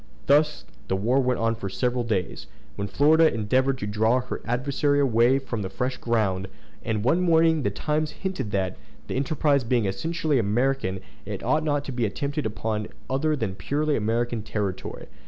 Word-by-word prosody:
Thus 150 +2 +3 0.2
the 95 - 0
war 115 +8 +2
went 125 -2 +1
on 115 0 +2
for 105 -4 -5
several 125 +6 0
days, 105 -6 -2 0.3
when 100 - -3
Florida 155 +8 +4
endeavored 130 +5 +1
to 105 - -4
draw 110 +4 +2
her 125 - -6
adversary 140 +4 +1
away 125 0 +4
on 115 -3 -1
to 95 - -3
fresh 125 +7 -2
ground; 100 -5 0 0.4
and 110 -2 -1
one 160 +9 +3
morning 165 -2 +4
the - - +1
Times 155 0 -1
hinted 190 - -4
that, 95 -2 -1 0.3
the - - -5
enterprise 140 0 +1
being 120 -2 +1
essentially 150 - 0
American, 110 -3 0 0.2
it - - -6
ought 155 +1 +2
not 145 -2 0
to - - -5
be 120 -3 0
attempted 145 +4 -2
upon 105 0 -3 0.2
other 150 +4 +1
than 110 -8 -2
purely 145 +10 -1
American 115 +1 0
territory. 105 -3 -4
125 Hz, 175 wpm, -25 LUFS, 105-145 Hz, 0.4 s, Florida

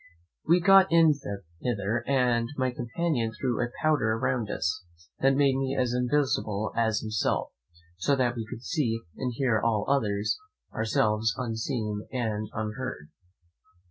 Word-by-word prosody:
We 170 +3 +4
got 195 +1 +6
in 165 -2 +6 0.5
hither, 110 0 -1
and 125 -4 +2
my 130 -1 +1
companion 120 0 -1
threw 125 -4 0
a 120 - -1
powder 145 -8 +2
round 115 -2 -1
us, 90 -1 -2 0.4
that 135 0 +3
made 140 -1 +3
me 135 0 -1
as 125 -1 +1
invisible 125 -5 0
as 110 -2 +1
himself; 110 -2 -1 0.5
so 140 +10 +2
that 125 -2 +1
we 115 -2 -5
could 120 -1 -8
see 120 -7 -1 0.2
and 125 -1 -2
hear 120 -4 +1
all 110 -3 +1
others, 105 - +1 0.3
ourselves 110 0 +1
unseen 110 -3 -3
and 110 -5 -2
unheard. 110 -6 -5
120 Hz, 140 wpm, -27 LUFS, 110-135 Hz, 0.5 s, got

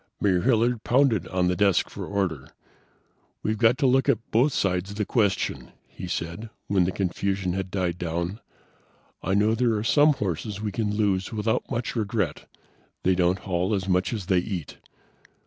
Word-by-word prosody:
Mayor 95 -3 +2
Hilliard 120 -1 +2
pounded 120 - +2
on 90 -1 0
the 90 - +1
desk 100 -3 +3
for - - -7
order. 90 -9 -2 0.9
"We've 110 0 -1
got 115 +2 +4
to 145 - +1
look 130 +1 +3
at 115 - 0
both 125 +7 +3
sides 95 -4 0
of 100 - -7
the 105 - 0
question," 105 -4 0
he 90 - -9
said, 85 +6 -4 0.2
when 95 -3 +2
the 90 - 0
confusion 95 0 -1
had 95 0 -3
died 90 -2 -2
down. 85 +3 -3 0.8
"I 95 +2 0
know 105 +2 +3
there 115 -1 +2
are 105 - -2
some 145 +5 +5
horses 100 - -3
we 105 -1 -3
can 105 +1 -1
lose 100 -2 0
without 110 0 -1
much 120 -2 -3
regret; 105 -7 -2 0.5
they 95 - +3
don't 90 0 +2
haul 95 +2 -1
as 95 -1 -3
much 90 0 +1
as 105 -6 -4
they 95 -1 +3
eat. 90 -5 -5
100 Hz, 180 wpm, -25 LUFS, 90-110 Hz, 0.9 s, some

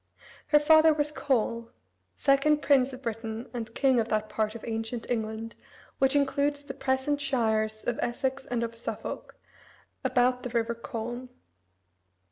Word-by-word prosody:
Her 300 - +6
father 315 +1 +6
was 295 0 +1
Coel, 235 -5 0 0.5
second 290 +1 +3
prince 275 -2 +4
of 260 +1 -10
Britain 225 0 -4
and 230 -2 -5
king 265 -3 +3
of 225 - 0
that 215 -1 -1
part 215 0 -1
of 230 - -8
ancient 225 +1 -3
England, 220 0 -3 0.5
which 270 +1 +3
includes 285 +1 +1
the 285 - -7
present 270 +2 0
shires 220 -5 0
of 240 - -1
Essex 265 +2 -2
and 240 -1 -1
of 230 0 -4
Suffolk, 230 - -6 0.7
about 250 0 +2
the 250 - -5
river 235 -1 0
Colne. 235 +2 -6
245 Hz, 145 wpm, -28 LUFS, 225-275 Hz, 0.7 s, Her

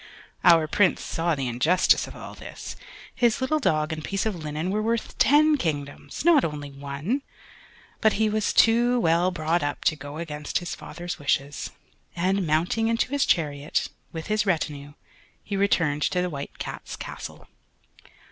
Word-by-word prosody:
Our 165 -3 +6
Prince 185 +3 +2
saw 165 -1 0
the 135 -2 -2
injustice 155 +10 +3
of - - -10
all - - -9
this; - - -8 0.4
his 240 -3 +2
little 265 +4 +1
dog 155 - +1
and 155 -1 -6
piece 195 +5 -2
of 220 -3 -1
linen 155 +2 -3
were 210 +2 0
worth 230 +1 -1
ten 300 +1 +5
kingdoms, 145 - -4
not 330 -5 +6
only 145 -2 -4
one; 140 - -3 0.8
but 220 -1 +4
he 220 +1 +2
was 215 0 0
too 240 +2 +4
well 170 -1 +3
brought 170 -1 0
up 145 0 -3
to 155 - +3
go 145 +1 -8
against 150 -3 -3
his 175 -1 -4
father's 175 +1 -7
wishes, 140 0 -1 0.5
and, 185 +1 +1
mounting 175 +9 +1
into 230 +2 0
his 285 -1 +1
chariot, 150 -3 0 0.2
with 160 -1 -6
his 215 0 +1
retinue, 150 -6 -2 0.5
he 205 - -4
returned 170 -7 +2
to 180 - +1
the 180 0 -1
White 140 -1 -6
Cat's - - -6
Castle. - - -8
170 Hz, 165 wpm, -25 LUFS, 150-215 Hz, 0.8 s, Our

